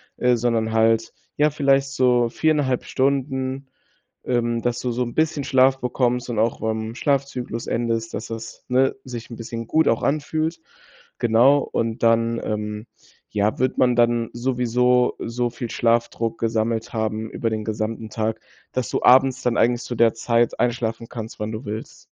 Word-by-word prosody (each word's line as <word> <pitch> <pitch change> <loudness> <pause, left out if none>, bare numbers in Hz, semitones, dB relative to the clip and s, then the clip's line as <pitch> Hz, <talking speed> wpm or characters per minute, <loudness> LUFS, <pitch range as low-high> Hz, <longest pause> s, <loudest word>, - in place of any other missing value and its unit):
äh, 125 -1 +2
sondern 115 -1 0
halt, 115 0 +2 0.2
ja, 150 +1 +3
vielleicht 140 -2 +2
so 125 -3 +2
4,5 145 -2 +1
Stunden, 135 0 -1 0.6
ähm, 120 -1 0
dass 120 -1 -1
du 125 - -2
so 125 +2 -1
'n 120 -1 -5
bisschen 155 -2 +1
Schlaf 130 0 +3
bekommst 125 0 0
und 115 -3 -2
auch 115 +1 0
beim 110 +1 -2
Schlafzyklus 130 -5 -2
endest, 115 -1 -1
dass - - -5
das, 115 0 -8
ne, 130 +1 +3
sich 120 -2 -8
'n 115 - -7
bisschen 115 0 -6
gut 160 +5 +2
auch 115 - +1
anfühlt, 155 +3 -1 0.6
genau. 120 +5 +5
Und 115 -4 -2
dann, 115 0 +2
ähm, 105 +1 -4 0.4
ja, 105 +1 0
wird 130 0 0
man 125 -2 +3
dann 120 -1 +2
sowieso 125 0 +1
so 120 +1 -2
viel 120 0 -6
Schlafdruck 115 -1 0
gesammelt 115 0 -1
haben 110 0 -2
über 115 - -2
den 110 -1 -3
gesamten 110 0 -3
Tag, 110 0 -2 0.3
dass 130 -3 -2
du - - -2
abends 130 0 +5
dann 120 -1 +1
eigentlich 120 +1 +2
zu 125 - -5
der 115 -1 +4
Zeit 115 0 +1
einschlafen 115 -1 -1
kannst, 115 -2 -7
wann 105 +1 -3
du 110 +3 -6
willst. 110 +2 -7
120 Hz, 165 wpm, -22 LUFS, 115-130 Hz, 0.6 s, genau